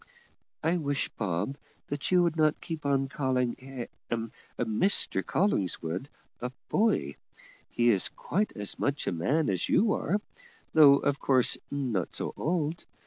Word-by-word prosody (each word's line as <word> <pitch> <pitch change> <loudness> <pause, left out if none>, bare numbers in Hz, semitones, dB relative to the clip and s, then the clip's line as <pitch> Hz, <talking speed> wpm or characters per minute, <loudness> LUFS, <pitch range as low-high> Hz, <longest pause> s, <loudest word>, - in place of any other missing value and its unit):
"I 165 +3 +2
wish, 145 -3 -1
Bob, 105 +7 -2 0.5
you 180 -1 +5
would 170 -2 +1
not 155 -1 +2
keep 160 -2 -5
calling 140 -1 +1 1.0
Ha, 115 - 0 0.4
Mr 110 - +1
Collingwood, 95 - -1 0.3
a 125 +1 -4 0.2
boy; 205 - +1 0.5
he 120 0 +3
is 100 -4 +3
quite 210 +3 -1
as 105 -1 -2
much 145 +1 0
a - - 0
man 135 - +1
as 95 -3 0
you 215 0 +4
are, 205 - 0 0.5
though 145 -3 +8
of 140 0 0
course 130 -3 +2
not 125 -11 -2
so - - -3
old. 165 0 -1
140 Hz, 135 wpm, -29 LUFS, 110-160 Hz, 1.0 s, though